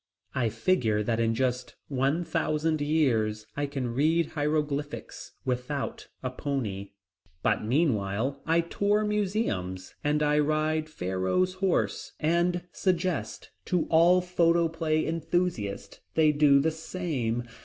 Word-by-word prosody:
I 120 -3 +1
figure 110 - +1
that 115 +1 0
in 115 0 +1
just 125 0 -1
one 140 +5 0
thousand 155 -1 0
years 115 -9 +1
I 145 0 -1
can 135 -4 -3
read 155 +5 +2
hieroglyphics 150 -1 -3
without 130 +3 -3 0.2
a 130 - -2
pony. 105 -8 -3 0.5
But - - +1
meanwhile, 125 -1 0
I 165 +1 +4
tour 205 +5 +1
museums 185 - -1
and 150 +1 +1
I 150 0 +3
ride 155 +1 +1
Pharaoh's 95 - 0
"horse," 185 -1 -1
and 175 +2 +1
suggest 185 -3 -1
to 180 -3 +1
all 170 +3 +6
photoplay 165 -3 +1
enthusiasts 165 - -2 0.2
they 155 -1 +5
do 145 -2 +5
the 160 +3 +2
same. 155 -8 -3
150 Hz, 120 wpm, -28 LUFS, 125-170 Hz, 0.5 s, all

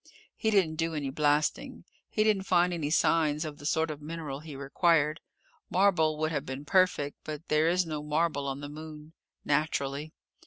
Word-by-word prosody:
He 220 - 0
didn't 185 -7 +2
do 165 0 -1
any 140 -3 -2
blasting. 155 - 0 0.3
He 215 - +1
didn't 205 -3 +1
find 180 0 +3
any 155 -4 -2
signs 155 -1 +2
of 150 -2 -7
the 145 - -4
sort 160 0 +1
of 150 -1 -8
mineral 150 -3 -5
he 155 -1 -9
required. 150 +2 +2 0.5
Marble 175 -5 +3
would 155 +1 -1
have 150 -3 -1
been 135 0 -6
perfect, 180 -5 +2
but 155 +2 -7
there 155 +2 +3
is 180 +1 +2
no 155 -2 -4
marble 150 -1 0
on 135 +1 -4
the 145 - -5
Moon. 155 +1 -10 0.3
Naturally! 145 0 -1
155 Hz, 180 wpm, -29 LUFS, 145-165 Hz, 0.5 s, find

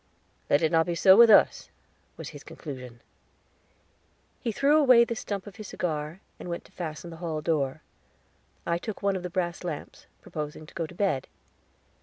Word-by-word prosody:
"Let 145 - +3
it 160 - +2
not 165 0 +3
be 175 - -1
so 190 +3 +7
with 235 +2 +8
us," 210 - +5 0.5
was - - -7
his - - -11
conclusion. 125 -5 -9 1.4
He 235 - -2
threw 280 +7 +3
away 255 -5 +7
the 235 - -3
stump 200 -3 -4
of 205 - -11
his 215 - -8
cigar, 155 +1 -3 0.2
and - - -7
went 170 - -5
to - - -19
fasten 170 0 -6
the 165 - -9
hall 160 -3 -2
door. 150 -2 -1 0.8
I 170 0 0
took 215 +1 -6
one 200 -1 +2
of 185 - -3
the 180 - -5
brass 175 0 -2
lamps, 165 -5 -7
proposing 150 0 -6
to - - -16
go 165 - -3
to 175 - -13
bed. 175 -9 0
170 Hz, 185 wpm, -27 LUFS, 155-200 Hz, 1.4 s, with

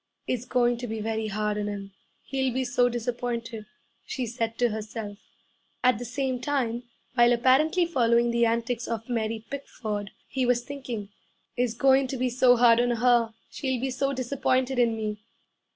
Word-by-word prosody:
'It's 250 -1 -2
going 245 -1 +2
to 245 +1 -5
be 220 0 -4
very 220 0 -2
hard 210 0 -1
on 205 - -2
him; 200 -1 -6 0.3
he'll 265 -1 -1
be 260 +2 -1
so 245 0 +2
disappointed,' 235 -2 -3 0.4
she 255 - -3
said 230 -1 -3
to 240 -1 +3
herself. 215 -1 -6 0.6
At 250 -4 +4
the 245 - -5
same 255 +1 -2
time, 250 -4 -1 0.3
while 240 -1 +5
apparently 280 +9 +3
following 235 -6 +2
the 235 0 +3
antics 235 +1 -1
of 225 -1 -4
Mary 225 -2 -2
Pickford, 215 -7 -5 0.2
he 265 - -1
was 245 -1 +2
thinking, 245 -7 -6 0.5
'It's 245 -2 0
going 265 +2 +4
to 265 - -4
be 250 0 0
so 245 0 +5
hard 235 -1 +6
on 245 0 +2
her! 240 -1 +3 0.2
She'll 260 -3 -2
be 265 +2 -2
so 275 +2 0
disappointed 255 0 0
in 230 -2 +3
me!' 210 -1 -3
240 Hz, 170 wpm, -27 LUFS, 225-255 Hz, 0.6 s, hard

